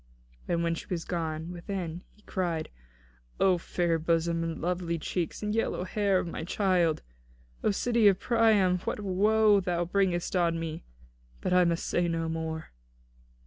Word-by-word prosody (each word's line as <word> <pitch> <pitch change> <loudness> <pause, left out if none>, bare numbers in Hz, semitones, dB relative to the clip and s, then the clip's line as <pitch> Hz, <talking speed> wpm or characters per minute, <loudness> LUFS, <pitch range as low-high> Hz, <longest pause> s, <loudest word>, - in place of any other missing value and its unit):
And 170 -1 0
when 170 0 +1
she 165 - -7
was 170 -3 -3
gone 160 -1 -3
within, 175 -1 -5
he 210 - -25
cried: 170 -5 -2 0.7
"O 185 -2 +4
fair 170 -1 0
bosom 165 +1 +1
and 165 -1 -2
very - - -9
lovely 175 -1 -1
cheeks 170 +4 -3
and 210 0 -1
yellow 225 -4 0
hair 200 0 +1
of - - -1
my 165 -2 -5
child! 175 -3 +1 0.6
O - - +3
city 230 +1 +3
of 195 -2 +4
Priam, 215 -6 +3
what 185 - -3
woe 210 +2 +4
thou 175 -2 -1
bringest 180 -1 0
on 170 -2 +2
me! 165 -1 -5 0.6
But - - -1
I 180 0 +5
must 170 -1 0
say 175 0 +1
no 165 -1 -1
more." 160 0 -4
175 Hz, 165 wpm, -29 LUFS, 165-195 Hz, 0.7 s, I